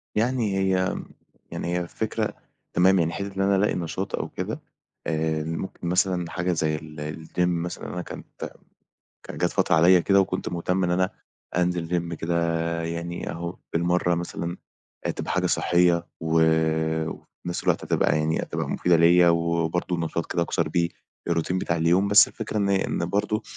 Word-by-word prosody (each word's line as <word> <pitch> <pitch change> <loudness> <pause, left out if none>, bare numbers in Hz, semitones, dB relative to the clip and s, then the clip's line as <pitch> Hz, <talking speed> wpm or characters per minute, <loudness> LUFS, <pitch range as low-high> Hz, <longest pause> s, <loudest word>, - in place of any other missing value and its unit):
يعني 115 -3 +1
هي، 95 -1 +1 0.6
يعني - - -4
هي 90 +1 0
الفكرة 85 - -2 0.4
تمام، 95 +2 +5
يعني 85 -1 +1
حِتّة 100 +1 -5
إن 95 - -1
أنا 100 0 +3
ألاقي 100 +2 +2
نشاط 90 +3 -3
أو - - -4
كده - - -4 0.5
آآ، 80 -1 0
ممكن 80 +2 -5
مثلًا 90 -1 +1
حاجة 90 0 -1
زي 80 -2 0
ال 75 +1 -7
الgym - - -8
مثلًا 85 0 -3
أنا 90 - -3
كانت - - -8 0.7
كانت - - -8
جات - - +2
فترة - - +2
عليَّ 85 +2 +6
كده 100 +2 +4
وكنت 95 -1 -1
مهتم 90 +2 0
إن 90 - 0
أنا 95 +1 +2 0.5
أنزِل 90 -2 +1
gym 85 -1 -1
كده 85 +1 -2 0.5
يعني 85 +1 -4
أهو 85 +1 -5 0.2
بالمرّة 90 +1 +2
مثلًا 85 0 -4 0.5
آآ - - +1
تبقى - - -5
حاجة - - +1
صحّية 85 -1 +3
و 80 0 +2 0.7
وفي 90 - -10
نَفس 85 - -3
الوقت - - +1
هتبقى - - +2
يعني، 80 +1 +1
هتبقى - - -3
مُفيدة 90 -1 +3
ليَّ 85 +1 +6
وبرضه 85 +1 +1
نشاط 85 0 -2
كده 85 - +1
أكسَر 85 -1 0
بيه 85 +2 +1 0.4
الروتين 85 +2 0
بتاع 85 - -1
اليوم، 85 +4 +3
بس 105 +1 +7
الفكرة 110 -1 -5
إن 100 -1 +1
إن 95 -3 0
برضه 105 +3 0
85 Hz, 170 wpm, -25 LUFS, 85-95 Hz, 0.7 s, بس